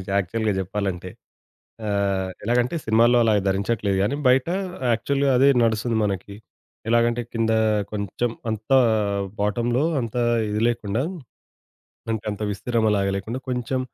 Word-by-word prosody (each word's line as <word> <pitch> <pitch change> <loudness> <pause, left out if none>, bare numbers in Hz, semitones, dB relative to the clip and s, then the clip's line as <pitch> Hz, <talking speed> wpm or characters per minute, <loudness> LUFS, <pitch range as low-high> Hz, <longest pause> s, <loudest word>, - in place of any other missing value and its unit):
యాక్చువల్‌గా 105 +2 0
చెప్పాలంటే. 95 -1 -3 0.8
ఆహ్, 100 -2 0
ఎలాగంటే 120 +6 +1
సినిమాల్లో 115 +2 +4
అలా 110 - +3 0.2
ధరించట్లేదు 100 0 0
కానీ, 115 +8 0
బయట 130 +2 +4 0.5
యాక్చువల్‌గా 140 +4 +1
అదే 135 +2 +5
నడుస్తుంది 115 +1 +1
మనకి. 100 0 -3 0.5
ఎలాగంటే 120 +1 +2
కింద 115 -1 +1 0.4
కొంచెం 105 +3 -2 0.2
అంతా 110 +5 +2 0.6
బాటమ్‌లో 120 +6 +1 0.2
అంత 115 0 -5 0.3
ఇది 105 +1 -1
లేకుండా, 115 0 -1 1.1
అంటే, 110 -1 -2
అంత 105 +1 -6
విస్తీర్ణం 115 +2 -1
అలాగా 100 -1 +1
లేకుండా 115 +7 -4
కొంచెం 125 +1 -1
110 Hz, 115 wpm, -23 LUFS, 100-120 Hz, 1.1 s, అదే